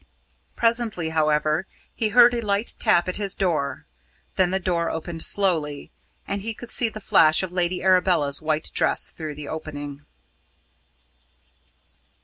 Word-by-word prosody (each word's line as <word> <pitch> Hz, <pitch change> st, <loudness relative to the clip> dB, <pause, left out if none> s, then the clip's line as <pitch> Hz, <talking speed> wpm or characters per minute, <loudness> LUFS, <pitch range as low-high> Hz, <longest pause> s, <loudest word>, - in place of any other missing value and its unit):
Presently, 230 Hz, -8 st, 0 dB
however, 155 Hz, +2 st, +1 dB, 0.3 s
he 220 Hz, -, -1 dB
heard 240 Hz, +2 st, +6 dB
a 235 Hz, -, -1 dB
light 205 Hz, +1 st, 0 dB
tap 175 Hz, -, +3 dB
at 185 Hz, -, -2 dB
his 200 Hz, -2 st, -3 dB
door, 155 Hz, -7 st, -1 dB, 0.5 s
then 185 Hz, -1 st, +2 dB
the 190 Hz, -, 0 dB
door 175 Hz, -2 st, -1 dB
opened 165 Hz, 0 st, -5 dB
slowly, 160 Hz, -8 st, +1 dB, 0.4 s
and 200 Hz, 0 st, -3 dB
he 225 Hz, +2 st, -5 dB
could 235 Hz, +3 st, -9 dB
see 235 Hz, -, +1 dB
the 215 Hz, -, -9 dB
flash 155 Hz, -5 st, +4 dB
of 185 Hz, -, -4 dB
Lady 180 Hz, 0 st, -1 dB
Arabella's 180 Hz, -7 st, +2 dB
white 155 Hz, 0 st, -2 dB
dress -, -, +2 dB
through 155 Hz, -3 st, -7 dB
the 145 Hz, 0 st, -8 dB
opening. 145 Hz, -2 st, -7 dB
175 Hz, 140 wpm, -23 LUFS, 155-200 Hz, 0.5 s, heard